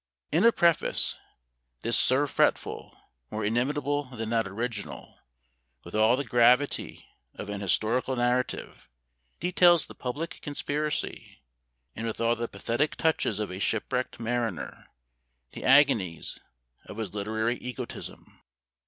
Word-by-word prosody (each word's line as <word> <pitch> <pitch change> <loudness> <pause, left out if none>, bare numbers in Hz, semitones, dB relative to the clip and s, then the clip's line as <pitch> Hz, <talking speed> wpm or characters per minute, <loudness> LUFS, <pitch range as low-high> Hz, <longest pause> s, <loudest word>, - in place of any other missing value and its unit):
In 160 +5 +3
a 235 - +8
preface, 170 -6 +2 0.7
this 115 +1 +1
Sir 130 +3 +3
Fretful, 140 - 0 0.3
more 110 -1 -3
inimitable 145 +5 0
than 115 -4 -6
that 115 -3 +1
original, 110 +1 -5 0.6
with - - -11
all 110 +3 +4
the 140 - -1
gravity 125 +3 +2 0.3
of - - -7
an 105 -1 -4
historical 115 +7 +1
narrative, 125 +1 -1 0.5
details 175 -2 +5
the - - -11
public 155 +8 -5
conspiracy; 145 - -3 0.5
and 115 +1 -3
with 110 - -4
all 115 +1 +2
the 120 0 -3
pathetic 115 +9 -1
touches 160 -1 +1
of 105 -2 -3
a 90 - -6
shipwrecked 115 +4 -1
mariner, 115 - -3 0.6
the - - -8
agonies 130 - +3 0.5
of - - -9
his 110 -5 -4
literary 110 +3 -1
egotism. 125 -2 -6
120 Hz, 125 wpm, -28 LUFS, 110-145 Hz, 0.7 s, a